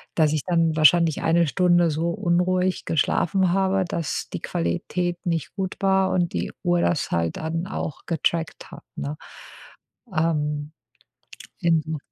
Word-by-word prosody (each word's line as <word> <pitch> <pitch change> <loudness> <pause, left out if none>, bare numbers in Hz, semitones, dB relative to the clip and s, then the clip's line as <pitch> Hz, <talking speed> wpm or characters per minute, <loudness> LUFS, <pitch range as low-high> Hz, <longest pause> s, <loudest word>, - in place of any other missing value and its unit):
Dass 155 -2 +3
ich 155 - 0
dann 165 -3 +2
wahrscheinlich 160 0 +4
1 170 0 +3
Stunde 175 0 +3
so 165 +3 -1
unruhig 185 -1 +1
geschlafen 180 +3 +1
habe, 190 -1 +1
dass 165 -4 -3
die - - -4
Qualität 175 - -2
nicht 165 -3 -2
gut 190 -2 -3
war 190 -1 +3
und 175 -2 0
die - - -2
Uhr 175 -1 +2
das 175 - 0
halt 85 -1 0
dann 165 +3 -3
auch 155 - -5
getrackt 165 -1 -2
hat, - - -11
ne? 70 +1 -4 1.0
Ähm. 150 -1 -1 0.9
Inso 160 -2 +1
170 Hz, 140 wpm, -24 LUFS, 155-180 Hz, 1.0 s, wahrscheinlich